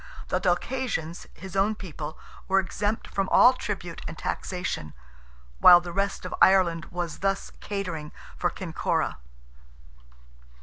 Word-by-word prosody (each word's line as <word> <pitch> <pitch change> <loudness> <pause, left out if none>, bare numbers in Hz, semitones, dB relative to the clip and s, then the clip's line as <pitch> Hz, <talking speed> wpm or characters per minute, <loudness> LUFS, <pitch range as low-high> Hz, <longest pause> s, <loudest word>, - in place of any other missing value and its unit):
The 180 - +1
Dalcassians, 180 -2 -1
his 190 0 -9
own 200 +3 +2
people, 155 -6 -7 0.3
were 195 0 +4
exempt 205 +3 -2
from 195 -1 -1
all 255 - +7
tribute 190 -8 -5
and 165 - -7
taxation—while 60 - +1
the 175 0 -7
rest 200 +1 -1
of - - -4
Ireland 175 -4 +5
was 175 -3 -5
thus 195 0 -1
catering 170 -7 -4 0.2
for - - 0
Kinkora. - - -2
180 Hz, 120 wpm, -26 LUFS, 160-195 Hz, 0.3 s, all